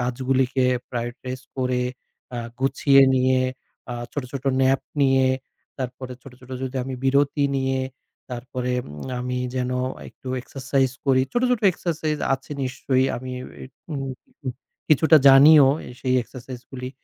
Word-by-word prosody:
কাজগুলিকে 130 +1 +1 0.3
prioritize 125 +2 -5
করে 125 -1 0 0.5
আ - - -2 0.2
গুছিয়ে 135 0 +5
নিয়ে 130 0 +3 0.5
আ - - -3 0.2
ছোট, 145 - -2
ছোট 135 0 -5 0.2
nap 135 +1 +3 0.2
নিয়ে, 135 -1 +4 0.5
তারপরে 130 0 -5
ছোট, 135 - -12
ছোট 125 0 -15
যদি 130 0 -4
আমি 130 -1 -4
বিরতি 140 +2 +3
নিয়ে, 130 0 0 0.5
তারপরে 125 +1 -3 0.2
উম 75 - -8
আমি 125 0 -2 0.2
যেন 125 -1 -1 0.4
একটু - - -19
exercise 135 0 -1
করি। 130 -1 +4
ছোট, 240 - +1
ছোট 245 -3 +2
exercise 155 -3 -2
আছে 135 - -11
নিশ্চয়ই 130 +1 +1
আমি 130 +1 -6
এ 130 - -7
বে - - -11 0.3
উ - - -2 0.9
কিছুটা 155 +1 +6
জানিও 140 +2 +9 0.3
সেই 130 0 +1
exercise 125 +1 -10
গুলি। 125 -1 -5
130 Hz, 135 wpm, -23 LUFS, 125-135 Hz, 0.9 s, জানিও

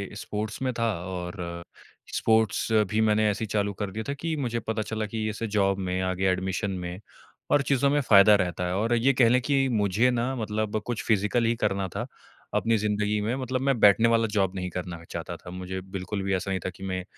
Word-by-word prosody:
sports 105 +3 -5
में 130 -1 0
था 115 - +2 0.2
और 90 0 -5 0.8
स्पोर्ट्स 110 -2 +2 0.2
भी 110 +1 +2
मैंने 105 0 +3
ऐसे 105 +2 -2
ही - - -9
चालू 100 -1 0
कर 100 -2 -2
दिया 110 +3 -4
था - - 0
कि 160 +2 -3
मुझे 120 0 -1
पता 110 0 -3
चला 110 0 -3
कि 110 0 -3
ऐसे 110 +2 -4
जॉब 100 -1 +2
में, 95 0 -2
आगे 95 +1 -1
एडमिशन 95 +1 -1
में 90 0 -5 0.5
और 145 - +5
चीज़ों 140 0 +2
में 145 +1 +2
फायदा 105 -3 +7
रहता 90 0 -2
है 90 - -1
और 115 +4 +1
ये 130 +4 +3
कह 120 -2 +4
लें 125 +1 +3
कि 135 0 +2
मुझे 105 +6 +3
ना 125 +2 -1
मतलब 110 -1 -2
कुछ 120 -2 -3
फिजिकल 110 +2 +2
ही 115 +1 +2
करना 100 -4 -1
था, - - -2 0.5
अपनी 115 0 +2
ज़िन्दगी 105 0 0
में 115 +4 -1
मतलब 130 -1 -2
मैं 125 -5 +1
बैठने 105 +3 +6
वाला 115 -1 +3
जॉब 95 -1 +1
नहीं 90 -1 -3
करना 85 -1 -6
चाहता 85 +1 -5
था, 90 - -12
मुझे 95 +1 -5
बिल्कुल 95 +1 -5
भी 95 0 0
ऐसा 95 +1 -3
नहीं 95 - 0
था - - 0
कि 95 - -12
मैं 95 -1 -3
105 Hz, 220 wpm, -26 LUFS, 95-115 Hz, 0.8 s, फायदा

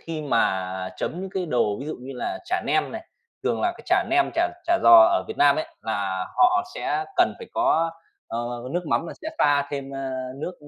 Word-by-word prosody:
khi 160 -2 -5
mà 95 -8 0
chấm 175 - -3
những 190 0 -6
cái 190 -2 -3
đồ 115 -8 +1
ví 140 - -6
dụ 155 - -4
như 130 +2 -8
là 340 - -3
chả 365 +1 -1
nem - - +1
này. - - -7 0.4
Thường - - 0
là 355 0 +1
cái - - -14
chả - - +3
nem, 350 0 +3
chả 345 +1 +2 0.2
chả 340 0 +3
giò - - +6
ở 345 0 +2
Việt - - -6
Nam 145 -1 +5
ấy, 155 - -2 0.2
là 95 -4 -2
họ 365 0 +4
sẽ 390 - -1
cần - - +3
phải 465 - -9
có, 330 - +2 0.4
ờ, 115 - -3 0.3
nước 175 0 -2
mắm 165 - 0
là - - -6
sẽ 315 - -3
pha 145 -1 +3
thêm, 140 -1 -5
a, 135 -1 -4 0.3
nước, 165 +6 -5
155 Hz, 225 wpm, -24 LUFS, -, 0.4 s, giò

